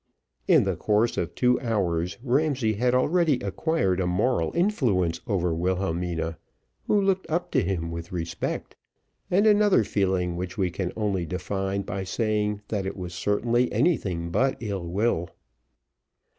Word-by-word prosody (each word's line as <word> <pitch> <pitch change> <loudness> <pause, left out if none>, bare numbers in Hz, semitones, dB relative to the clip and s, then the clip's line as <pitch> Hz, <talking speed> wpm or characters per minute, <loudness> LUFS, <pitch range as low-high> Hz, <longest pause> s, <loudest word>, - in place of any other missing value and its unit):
In - - +6
the - - -1
course 110 +3 +1
of - - -3
two 125 0 +3
hours 90 -7 -1
Ramsay 135 -3 +1
had 125 +4 +1
already 160 +3 +3
acquired 100 - 0
a 90 - 0
moral 90 -1 +1
influence 110 - +1
over 90 -5 0
Wilhelmina, 85 -2 -1 0.5
who 210 - +3
looked 195 -1 0
up 170 +3 -1
to - - +3
him 85 -2 -2
with 85 +1 -6
respect, 85 -2 -4 0.5
and 195 +4 +3
another 205 - +5
feeling 95 -3 0
which 90 +3 -5
we 95 -3 0
can 90 0 -3
only 100 -5 -1
define 95 +3 -2
by 95 0 -4
saying 105 +1 -1
that 100 -3 -2
it 95 - -5
was 90 -2 -6
certainly 115 +6 +1
anything 90 - 0
but 135 +8 +1
ill 100 -6 -4
will. 90 -2 0
100 Hz, 145 wpm, -26 LUFS, 90-125 Hz, 0.5 s, In